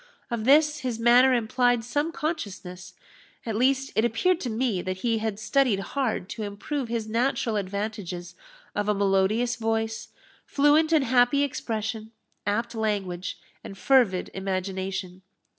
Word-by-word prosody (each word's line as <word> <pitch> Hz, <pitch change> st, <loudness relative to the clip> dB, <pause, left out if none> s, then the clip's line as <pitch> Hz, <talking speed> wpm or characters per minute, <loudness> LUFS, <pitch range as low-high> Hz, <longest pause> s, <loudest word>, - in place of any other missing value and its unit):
Of 225 Hz, -2 st, -2 dB
this 300 Hz, +2 st, +5 dB
his 250 Hz, -5 st, -3 dB
manner 240 Hz, +3 st, +5 dB
implied 245 Hz, +1 st, +1 dB
some 290 Hz, +7 st, -1 dB
consciousness; 200 Hz, -, -5 dB, 0.5 s
at 225 Hz, -2 st, -2 dB
least, 270 Hz, +3 st, +1 dB
it 220 Hz, -, +3 dB
appeared 320 Hz, +10 st, +2 dB
to 255 Hz, -, -3 dB
me 225 Hz, -4 st, 0 dB
that 185 Hz, +1 st, -4 dB
he 230 Hz, -2 st, +2 dB
had 215 Hz, -2 st, -2 dB
studied 220 Hz, -1 st, +2 dB
hard 250 Hz, -9 st, -1 dB
to 225 Hz, -, -6 dB
improve 215 Hz, +7 st, -4 dB
his 230 Hz, -2 st, -2 dB
natural 230 Hz, 0 st, 0 dB
advantages 200 Hz, -3 st, -4 dB, 0.4 s
of 205 Hz, 0 st, -1 dB
a 210 Hz, -, +2 dB
melodious 200 Hz, +5 st, +1 dB
voice, 225 Hz, 0 st, -2 dB, 0.4 s
fluent 295 Hz, +3 st, +3 dB
and 315 Hz, -4 st, +4 dB
happy 245 Hz, +3 st, +3 dB
expression, 220 Hz, -5 st, -3 dB, 0.4 s
apt 230 Hz, +4 st, -1 dB
language, 200 Hz, -5 st, -2 dB, 0.3 s
and 195 Hz, -, -9 dB
fervid 235 Hz, -7 st, +3 dB
imagination. 190 Hz, -1 st, -4 dB
225 Hz, 140 wpm, -26 LUFS, 200-255 Hz, 0.5 s, this